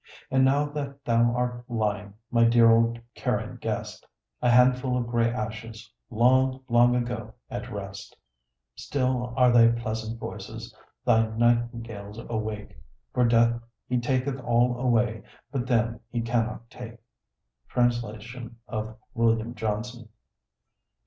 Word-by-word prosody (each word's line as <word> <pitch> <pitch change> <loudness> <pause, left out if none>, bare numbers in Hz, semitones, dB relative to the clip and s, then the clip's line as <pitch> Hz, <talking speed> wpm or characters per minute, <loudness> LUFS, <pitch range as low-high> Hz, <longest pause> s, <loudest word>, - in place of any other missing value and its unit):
And 130 0 +4
now 140 +2 +3
that 140 -2 -6
thou 120 0 +3
art 125 0 -2
lying, 105 -3 -2 0.2
my 115 -1 +4
dear 115 0 +6
old 115 +1 +3
Carian - - -2
guest, - - -4 0.4
A 125 - +3
handful 125 +1 +4
of 120 - -1
gray 120 0 +1
ashes, 110 -1 -6 0.2
long, 130 +3 +3
long 120 +1 +5
ago 120 0 -3 0.2
at - - -5
rest, - - -8 0.6
Still 130 -3 -1
are 125 -1 +6
thy 115 -1 +7
pleasant 115 -1 -2
voices, - - -7 0.3
thy 115 0 +4
nightingales, 115 -2 -1
awake; 110 -2 -5 0.4
For 125 - +3
Death 115 0 +3 0.3
he 125 0 +1
taketh 130 +2 -1
all 120 0 +2
away, 120 -3 +1 0.3
but 130 -3 -2
them 120 -1 +1
he 120 - -2
cannot 115 0 -2
take. 120 -1 -9 0.7
Translation 120 0 -2
of 110 0 -4 0.2
William 115 -1 +1
Johnson. 115 +1 -4
120 Hz, 125 wpm, -26 LUFS, 115-125 Hz, 0.7 s, thy